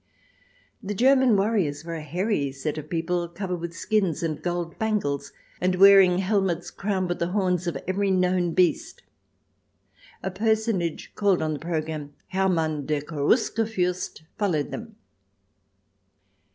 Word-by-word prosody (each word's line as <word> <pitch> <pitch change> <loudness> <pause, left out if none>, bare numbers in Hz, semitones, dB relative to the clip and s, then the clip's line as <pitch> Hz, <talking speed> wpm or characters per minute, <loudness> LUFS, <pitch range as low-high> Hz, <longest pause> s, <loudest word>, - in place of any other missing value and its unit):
The 205 +1 -4
German 260 -1 +4
warriors 195 -8 0
were 170 - -5
a 160 - -4
hairy 160 -1 -1
set 145 +3 -4
of 150 0 -10
people 170 +1 -1
covered 180 +1 -4
with 170 0 -6
skins 195 -6 0
and 155 -3 -2
gold 175 -1 -3
bangles, 205 -11 -1 0.3
and 180 0 +2
wearing 195 -1 +7
helmets 190 -3 0
crowned 195 -2 -1
with 175 - -3
the 170 - 0
horns 180 -2 0
of 165 -5 -1
every 195 +2 0
known 180 -2 +1
beast. 180 -2 +1 1.2
A 190 - -2
personage, 215 -4 -1
called 200 -5 +2
on 155 0 -1
the 145 - -4
programme 155 -3 -4
Hermann 165 -6 0
der 150 -2 0
Cherusker 170 - +1
furst, 180 -6 -2 0.2
followed 170 -9 0
them. 225 -1 -7
180 Hz, 140 wpm, -25 LUFS, 160-200 Hz, 1.2 s, wearing